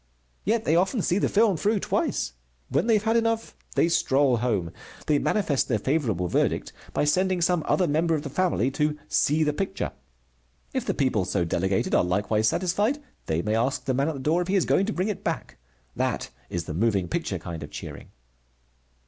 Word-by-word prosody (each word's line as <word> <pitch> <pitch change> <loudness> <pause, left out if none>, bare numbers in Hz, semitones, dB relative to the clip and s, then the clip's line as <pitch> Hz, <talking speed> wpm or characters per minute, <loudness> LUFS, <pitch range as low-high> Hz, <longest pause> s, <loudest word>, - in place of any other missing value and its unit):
Yet 220 +2 +1
they 160 - +3
often 190 +5 +2
see 180 - +2
the - - +1
film 205 -4 +3
through 210 +6 +1
twice. - - -1 0.4
When 140 - +1
they 225 - +5
have 210 - +1
had 225 +1 +2
enough, 230 0 0 0.2
they - - +4
stroll 135 -6 +3
home. 105 -8 -1 0.3
They 150 -2 +3
manifest 165 -10 +1
their 115 - +1
favorable 110 - 0
verdict - - 0 0.2
by - - 0
sending 185 +4 +2
some 175 0 +2
other 180 - +2
member 160 +2 +2
of 150 - -3
the 145 - -5
family 165 -7 +1
to 150 +2 0
"see 155 +2 +2
the 150 -1 +1
picture." 195 +4 -3 0.8
If - - -2
the - - 0
people 130 -8 +1
so 90 -1 0
delegated 95 +3 0
are - - +4
likewise 105 +4 +1
satisfied, 200 - +1 0.3
they 80 +2 0
may 105 - 0
ask 120 +5 0
the 130 - +1
man 135 +3 +1
at 160 - -2
the - - -6
door 155 +6 +1
if 175 - -3
he 195 - +1
is 190 - +3
going 195 - +2
to - - 0
bring 185 +3 -1
it 210 - -4
back. - - -4 0.4
That - - -1 0.2
is 85 - -2
the 75 - -6
moving 100 0 +1
picture - - -2
kind 85 -2 -7
of 75 - -7
cheering. - - -8
150 Hz, 205 wpm, -26 LUFS, -, 0.8 s, they